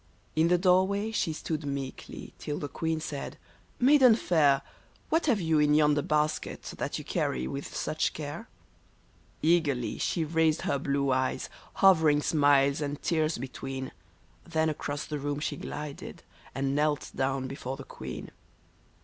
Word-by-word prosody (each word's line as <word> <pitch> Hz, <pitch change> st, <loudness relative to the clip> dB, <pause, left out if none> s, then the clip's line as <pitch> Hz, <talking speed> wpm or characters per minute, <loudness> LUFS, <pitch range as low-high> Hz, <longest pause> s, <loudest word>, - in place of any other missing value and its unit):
In 160 Hz, +1 st, +4 dB
the 180 Hz, +1 st, +4 dB
door 185 Hz, +1 st, +4 dB
way 200 Hz, +2 st, -2 dB
she 190 Hz, -6 st, 0 dB
stood 155 Hz, 0 st, -4 dB
meekly, 140 Hz, -2 st, -6 dB
till 150 Hz, -1 st, -4 dB
the 145 Hz, -, -4 dB
queen 160 Hz, +2 st, -2 dB
said, 150 Hz, -3 st, -5 dB, 0.4 s
^' -, -, +3 dB
Mai 295 Hz, +3 st, +7 dB
den 255 Hz, -5 st, +7 dB
fair. 145 Hz, -9 st, +3 dB, 0.5 s
What 325 Hz, 0 st, +1 dB
have 235 Hz, -7 st, +3 dB
you 160 Hz, -3 st, +2 dB
in 150 Hz, 0 st, +4 dB
yonder 150 Hz, -1 st, +4 dB
basket 150 Hz, -1 st, -1 dB, 0.2 s
that -, -, -2 dB
you -, -, -8 dB
carry 65 Hz, -1 st, -1 dB
with 65 Hz, -, -5 dB
such -, -, -1 dB
care? -, -, -6 dB, 0.5 s
" -, -, -34 dB
RENA 170 Hz, +3 st, +6 dB
157 140 Hz, -7 st, -1 dB
Eagerly -, -, -5 dB
she 165 Hz, -3 st, 0 dB
raised 160 Hz, 0 st, +2 dB
her 140 Hz, -, 0 dB
blue 140 Hz, 0 st, 0 dB
eyes, 130 Hz, 0 st, 0 dB, 0.3 s
hovering 160 Hz, -6 st, +5 dB
smiles 145 Hz, -1 st, +3 dB
and 145 Hz, 0 st, -3 dB
tears 160 Hz, -2 st, +1 dB
between, 130 Hz, +1 st, -5 dB, 0.5 s
Then 160 Hz, -1 st, 0 dB
across 145 Hz, -1 st, -4 dB
the 150 Hz, -1 st, -4 dB
room 145 Hz, +1 st, -2 dB
she 150 Hz, 0 st, -2 dB
glided, 145 Hz, 0 st, -7 dB, 0.3 s
and 135 Hz, +1 st, 0 dB
knelt 150 Hz, 0 st, 0 dB
down 135 Hz, 0 st, -1 dB
before 135 Hz, 0 st, -5 dB
the 140 Hz, -, -8 dB
queen. 65 Hz, -1 st, -8 dB
150 Hz, 165 wpm, -29 LUFS, 140-160 Hz, 0.5 s, Mai